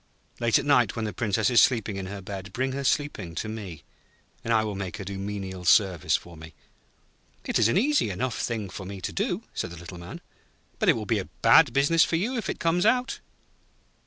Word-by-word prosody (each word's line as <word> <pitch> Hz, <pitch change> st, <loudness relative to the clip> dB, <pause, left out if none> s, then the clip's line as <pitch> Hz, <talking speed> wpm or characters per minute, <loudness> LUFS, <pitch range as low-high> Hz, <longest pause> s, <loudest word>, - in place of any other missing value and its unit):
'Late 115 Hz, -3 st, +3 dB
at -, -, -2 dB
night, 125 Hz, -7 st, +3 dB
when 115 Hz, -2 st, -2 dB
the 105 Hz, -, -4 dB
Princess 110 Hz, +3 st, 0 dB
is 120 Hz, -, +6 dB
asleep 120 Hz, -5 st, +3 dB
in 100 Hz, -3 st, -4 dB
her 100 Hz, 0 st, -7 dB
bed, 95 Hz, 0 st, -7 dB
bring 130 Hz, +2 st, -1 dB
her, 140 Hz, +1 st, -4 dB
sleeping, 120 Hz, -, -1 dB
to 105 Hz, -, -3 dB
me, 100 Hz, -9 st, -7 dB, 0.6 s
and 115 Hz, -, -2 dB
I 110 Hz, -1 st, +4 dB
will 105 Hz, -1 st, -3 dB
make 95 Hz, -2 st, -5 dB
her 100 Hz, -, -6 dB
do 100 Hz, 0 st, -6 dB
menial 95 Hz, -2 st, -5 dB
service 90 Hz, -1 st, +3 dB
for 85 Hz, -1 st, -6 dB
me.' 80 Hz, +1 st, -12 dB, 0.9 s
'It -, -, 0 dB
is 115 Hz, -, +5 dB
an 115 Hz, -, +2 dB
easy 280 Hz, -, +2 dB
enough 110 Hz, +3 st, -3 dB
thing 110 Hz, -4 st, -2 dB
for 95 Hz, +2 st, -8 dB
me 95 Hz, +1 st, -7 dB
to -, -, -5 dB
do,' -, -, -1 dB
said -, -, -3 dB
the 85 Hz, -, -10 dB
Little 85 Hz, +1 st, -10 dB
Man. 85 Hz, -, -9 dB, 0.6 s
'But -, -, +2 dB
it -, -, +7 dB
will 110 Hz, -, -4 dB
be 110 Hz, 0 st, +1 dB
a 95 Hz, -, -6 dB
bad 160 Hz, -6 st, +7 dB
business 145 Hz, +6 st, +4 dB
for -, -, 0 dB
you 220 Hz, +10 st, -1 dB
if 230 Hz, -, -3 dB
it -, -, -3 dB
comes 170 Hz, +2 st, +1 dB
out.' 250 Hz, +3 st, +1 dB
105 Hz, 225 wpm, -26 LUFS, 95-130 Hz, 0.9 s, it